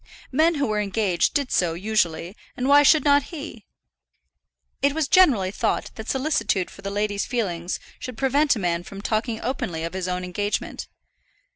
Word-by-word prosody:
Men 320 +5 +3
who 285 -1 0
were 215 -3 0
engaged 200 - 0
did 280 -3 0
so 170 -3 +1
usually, 180 -2 -1 0.2
and 250 - -1
why 285 +1 +7
should 300 +2 +5
not 285 -1 +4
he? 320 -2 -8 1.1
It 280 0 +3
was 315 -2 0
generally 255 - +4
thought - - -1
that 220 0 -8
solicitude 265 - 0
for - - -13
the 195 - -4
lady's 205 0 -1
feelings 180 -8 -2 0.2
should 255 -3 -7
prevent 280 +3 +2
a - - -4
man 175 -2 0
from 195 +3 -10
talking 220 +1 -1
openly 180 -11 -3
of 165 - -4
his 185 -1 -3
own 180 0 -2
engagement. 205 +3 -3
215 Hz, 170 wpm, -24 LUFS, 185-280 Hz, 1.1 s, why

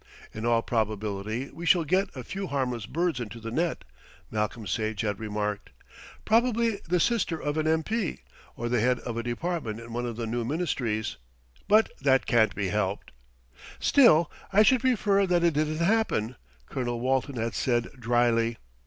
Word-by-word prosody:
"In 110 +2 -3
all 115 -1 +3
probability 110 +1 -2
we 170 - -9
shall 170 +1 +5
get 185 +5 +1
a 130 - -6
few 195 +8 -5
harmless 125 -6 -2
birds 170 -2 -1
into 115 -1 -6
the 115 0 -6
net," 165 +6 -1 0.5
Malcolm 105 +1 -2
Sage 110 +2 -2
had 105 -3 -2
remarked. 105 -1 -3 0.6
"Probably 230 -1 +2
the 180 +1 +2
sister 190 -7 +1
of 145 0 -2
an 155 0 0
M.P., 160 - 0 0.3
or 120 - -3
the 120 0 +1
head 125 +2 +2
of 120 - -5
a 115 - -1
department 120 -1 -3
in 115 0 -10
one 120 +1 -2
of 120 - -4
the 115 0 -3
new 120 +1 -2
Ministries; 120 -7 -2 0.5
but 215 +2 +4
that 135 -1 +3
can't 110 -3 +3
be 100 -2 -1
helped." 100 0 -2 0.7
"Still 170 - +5 0.2
I 205 +2 +6
should 250 +2 +4
prefer 205 -6 +2
that 175 -1 +2
it 170 -2 +3
didn't 155 +1 0
happen," 175 - +1 0.3
Colonel 120 - -3
Walton 130 +2 0
had 115 0 -2
said 120 -3 0
drily. 115 -1 +2
125 Hz, 170 wpm, -27 LUFS, 115-170 Hz, 0.7 s, I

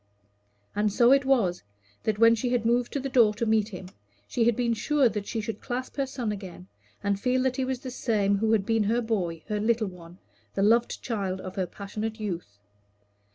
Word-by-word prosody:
And 210 0 +1
so 240 +3 +5
it 275 0 +5
was, 225 -10 +2 0.4
that 215 -2 +1
when 230 +1 +6
she 230 +2 -1
had 240 -2 0
moved 240 +1 +2
to 280 - 0
the 275 - -3
door 235 -5 +4
to 230 - -1
meet 220 -2 +2
him, 185 -2 -8 0.4
she 230 - +1
had 235 -1 +3
been 235 -1 +1
sure 280 +4 +2
that 210 -3 -3
she 225 - -2
should 215 0 -5
clasp 255 +1 -4
her 275 -1 0
son 250 -5 -3
again, 190 -3 -8 0.4
and 200 -1 0
feel 255 +2 +1
that 260 -1 0
he 265 - 0
was 255 -1 -3
the 255 - -6
same 205 -5 +1
who 220 +1 +1
had 205 -3 +2
been 225 -1 +2
her 230 +4 +2
boy, 180 -8 -2
her 210 -1 -1
little 225 +1 +1
one, 175 -1 -13 0.4
the 195 - +1
loved 230 +3 +2
child 195 -5 -2
of 185 0 -7
her 185 -2 -1
passionate 215 +4 -5
youth. 175 - -5
220 Hz, 215 wpm, -27 LUFS, 200-245 Hz, 0.4 s, when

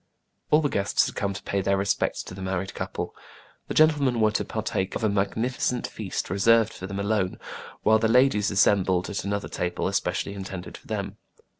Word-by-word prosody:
All 150 - +5
the 150 - +2
guests 100 -7 +1
had - - -4
come 100 - -1
to 100 - -7
pay 100 - -1
their 100 +1 +1
respects 100 +1 0
to - - -9
the 95 - -8
married 95 0 -3
couple. - - -5 0.5
The - - -4
gentlemen 145 -6 +4
were 110 -1 +4
to - - 0
partake 95 0 -2
of - - -3
a 110 - +3
magnificent 115 +5 0
feast 100 -4 -4
reserved 115 +3 +4
for 95 - -7
them 100 0 -4
alone, 100 -2 0 0.5
while 110 +1 +5
the 110 - +2
ladies 115 -3 +4
assembled 95 -1 +2
at 100 - -3
another 100 0 -2
table 90 0 -2
especially 95 0 -1
intended 95 -2 -7
for - - -14
them. - - -4
100 Hz, 190 wpm, -26 LUFS, 95-110 Hz, 0.5 s, All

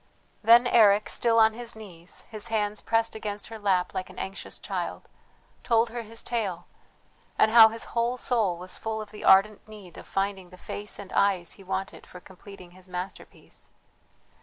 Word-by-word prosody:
Then 235 +3 +6
Eric, 210 -4 +4
still 230 -1 +2
on 220 -1 +5
his 235 0 -6
knees, 180 -5 -7
his 215 0 -4
hands 210 -2 -1
pressed 225 0 0
against 210 -1 -5
her 225 -1 -8
lap 190 -3 0
like 185 0 -4
an 185 - -14
anxious 195 +1 -6
child, - - -5 0.5
told 230 -1 +2
her 240 0 -4
his 230 +1 -5
tale, 195 -7 -3 0.7
and 220 - +4
how 225 -1 +9
his 225 +1 -5
whole 235 +1 0
soul 220 -8 +1
was 180 +1 -8
full 220 0 -3
of 215 -1 -8
the 210 - -10
ardent 200 +3 +4
need 210 -5 -12
of - - -13
finding 195 -2 -2
the 185 - -14
face 205 +3 -7
and 200 -2 -10
eyes 190 -4 +2
he 195 - -12
wanted 190 +1 -5
for 180 - -12
completing 185 0 -14
his 185 +1 -14
masterpiece. 180 +1 -8
210 Hz, 180 wpm, -26 LUFS, 190-225 Hz, 0.7 s, how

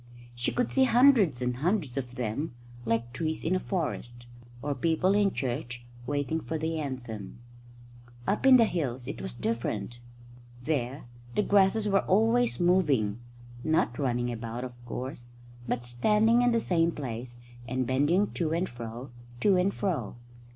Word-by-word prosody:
She 120 0 -1
could 245 - 0
see 265 -1 +4
hundreds 235 - +5
and 125 0 -1
hundreds 160 - 0
of 125 -3 -4
them, 120 +4 -3 0.3
like 115 +1 -1
trees 160 +3 -2
in 175 +3 +2
a - - +1
forest, 120 - -4 0.4
or 145 0 0
people 165 +7 +2
in 205 -1 +3
church 120 -3 -4 0.2
waiting 145 +2 -1
for 160 - -3
the 160 +1 -2
anthem. 120 -8 -6 0.9
Up 210 +6 +1
in 260 -1 +9
the 230 - +6
hills 130 - -3
it 140 - -5
was - - -5
different. 115 - -3 0.6
There 135 -2 -2 0.3
the 210 - +3
grasses 205 +2 +3
were 195 -1 +4
always 225 +5 +2
moving 150 - +2 0.4
not 160 -5 +1
running 120 -3 0
about, 115 +1 -5
of 125 -1 -6
course, 125 0 -6 0.4
but 120 +1 -2
standing 210 - +3
in 245 0 +4
the 230 - +3
same 170 -5 +2
place 120 -4 -6 0.3
and 130 +1 -1
bending 145 - +2
to 160 -2 -1
and 175 +3 0
fro, 120 +2 -8 0.3
to 200 -2 +5
and 185 +2 +2
fro. 165 - -2
145 Hz, 155 wpm, -28 LUFS, 120-185 Hz, 0.9 s, in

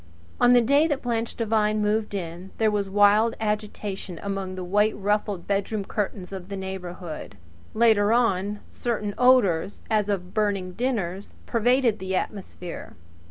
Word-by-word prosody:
On 245 0 +6
the 245 - +7
day 280 +7 +4
that 290 -4 -2
Blanche 230 -2 -2
Devine 215 -2 +1
moved 210 0 0
in 175 0 -5
there 220 -1 +3
was 200 -2 -1
wild 205 +3 +4
agitation 210 -4 -3
among 195 -2 -3
the 185 - -5
white 210 +4 +2
ruffled 205 -2 -1
bedroom 200 +1 -1
curtains 195 -3 -3
of 190 -1 -7
the 200 - -4
neighbourhood. 180 - -6 0.4
Later 215 -2 +4
on 205 -3 +1
certain 215 -4 -2
odours, 205 -9 +3
as 210 -2 +2
of 185 -3 -2
burning 200 -4 0
dinners, 200 -4 -3
pervaded 240 -1 +2
the 190 0 -2
atmosphere. 185 -3 -5
205 Hz, 145 wpm, -25 LUFS, 190-220 Hz, 0.4 s, the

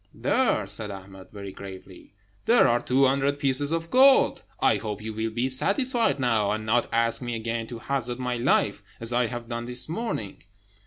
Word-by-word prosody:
"There!" 135 - +1
said 105 +2 -2
Ahmed, 95 -1 -11
very 100 -2 -8
gravely, 95 0 -12 0.3
"there 235 +1 +5
are 120 +1 +2
two 135 +2 +2
hundred 140 +1 +1
pieces 140 +1 +3
of 165 0 -3
gold. 265 +1 +5 0.2
I - - +3
hope 105 -2 -5
you 110 0 -5
will 110 +1 -2
be 120 +3 -1
satisfied 225 - +1
now, 115 -5 +1
and 110 +1 -2
not 120 +2 +1
ask 115 +1 0
me 120 -1 -4
again 115 0 -3
to 120 - -7
hazard 120 0 -2
my 125 -1 -2
life, 120 - +1 0.2
as 115 +1 -2
I 120 0 +2
have 120 0 -6
done 120 0 -4
this 125 0 -2
morning." 165 - -4
120 Hz, 190 wpm, -25 LUFS, 110-140 Hz, 0.3 s, there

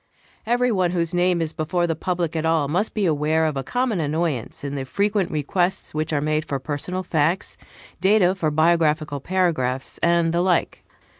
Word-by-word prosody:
Every 245 +1 +2
one 185 -4 +1
whose 170 -2 -1
name 175 -1 +2
is 160 - -4
before 175 +2 -1
the 165 -1 -1
public 170 -1 -2
at 160 - -1
all 160 -3 +2
must 180 +9 -1
be 210 -3 +1
aware 155 0 +1
of 155 -2 -1
a 135 - -1
common 245 - -1
annoyance 155 -5 -2
in 140 -1 -4
the 140 -2 -3
frequent 200 +6 0
requests 175 +5 -1
which 155 +1 -2
are 150 - +1
made 155 +1 0
for 140 - -3
personal 150 +7 -3
facts, 165 +2 0 0.4
data 190 -2 +4
for 175 -5 -1
biographical 155 -2 +2
paragraphs, 140 -7 -1
and 170 -1 +2
the 170 - +2
like. 180 -2 0
165 Hz, 180 wpm, -22 LUFS, 150-180 Hz, 0.4 s, data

